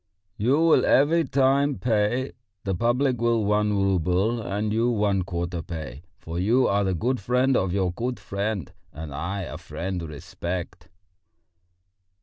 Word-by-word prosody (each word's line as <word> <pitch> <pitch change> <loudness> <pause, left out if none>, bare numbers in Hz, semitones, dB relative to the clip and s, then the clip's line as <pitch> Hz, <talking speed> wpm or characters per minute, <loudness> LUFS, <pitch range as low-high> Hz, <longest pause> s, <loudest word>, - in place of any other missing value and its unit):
"You 125 +7 +2
will 165 0 +5
every 160 +4 +4
time 140 +1 +2
pay; 120 +3 0 0.3
the 95 - -1
public 120 +5 +1
will 115 -2 +2
one 105 0 +2
rouble, 95 +4 +1
and 105 +2 -2
you 115 +2 +2
one 105 -4 +1
quarter 85 -1 -3
pay; 75 -5 -7 0.2
for 85 +1 -6
you 120 +7 +3
are 100 +1 +2
the 95 -1 0
good 125 +8 0
friend 125 +5 +2
of 95 -5 +1
your 95 -1 0
good 120 +7 -3
friend; 100 -4 -3 0.2
and 75 -2 -8
I 90 +7 -3
a - - -7
friend 90 0 -4
respect...." 85 +4 -6
100 Hz, 145 wpm, -25 LUFS, 90-120 Hz, 0.3 s, will